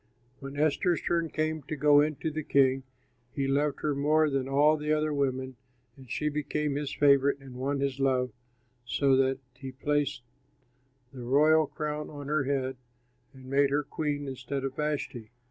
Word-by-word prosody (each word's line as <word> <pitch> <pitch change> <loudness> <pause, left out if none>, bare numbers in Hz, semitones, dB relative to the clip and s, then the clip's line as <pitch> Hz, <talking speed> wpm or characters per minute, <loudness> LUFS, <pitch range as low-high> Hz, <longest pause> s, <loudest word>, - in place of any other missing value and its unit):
When 135 0 -8
Esther's 155 +3 +2
turn 170 -1 0
came 155 0 -1
to 145 +3 -5
go 145 0 +5
in 155 0 0
to 160 - -1
the 155 +1 -3
king, 135 -2 +3 0.5
he 135 -1 0
loved 145 +1 0
her 150 - 0
more 150 +2 +2
than 135 -1 -1
all 145 +3 +4
the 150 0 -3
other 155 0 +1
women, 130 -2 -2 0.4
and 130 -2 -15
she 150 +4 -2
became 150 0 -1
his 145 -1 -3
favorite 140 -1 +4
and 135 -2 -12
won 135 +2 -2
his 140 -1 -1
love, 130 -2 +1 0.5
so 135 +2 +2
that 135 0 +2 0.2
he 130 +1 -8
placed 140 -1 -1 0.9
the 130 - -8
royal 150 +5 +4
crown 150 0 -4
on 145 -1 -8
her 150 -2 +1
head 130 -1 -1 0.5
and 130 -2 -15
made 140 +1 +2
her 145 +2 +1
queen 145 -1 -3
instead 135 +1 -4
of 135 -1 -3
Vashti. 145 -7 -3
140 Hz, 175 wpm, -29 LUFS, 135-150 Hz, 0.9 s, go